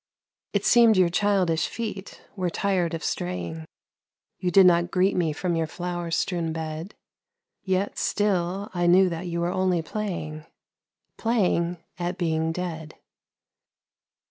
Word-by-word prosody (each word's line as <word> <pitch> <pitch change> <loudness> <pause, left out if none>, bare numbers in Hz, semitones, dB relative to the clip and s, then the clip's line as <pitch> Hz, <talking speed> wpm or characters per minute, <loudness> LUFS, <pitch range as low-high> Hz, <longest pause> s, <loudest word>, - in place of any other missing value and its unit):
It 200 -1 0
seemed 230 -3 +6
your 180 -2 +5
childish 180 -3 +1
feet 210 -4 -6
were 185 -3 -1
tired 180 -2 0
of 165 - -6
straying, 85 -3 -3 0.7
You 180 - 0
did 190 +1 +7
not 175 -1 +4
greet 185 +2 +2
me 170 -3 +1
from 175 +3 -2
your 165 -1 0
flower 175 0 -4
strewn 165 0 -1
bed 160 +3 -5 0.7
Yet 190 +1 -1
still 195 -1 0
I 175 -1 +1
knew 185 +2 +6
that 170 +1 -5
you 170 0 -2
were 175 +1 0
only 185 -3 +1
playing 165 -6 -5 0.7
Playing 180 -7 +1 0.2
at 175 +1 -2
being 160 -2 0
dead. 165 -3 -5
175 Hz, 135 wpm, -25 LUFS, 165-190 Hz, 0.7 s, did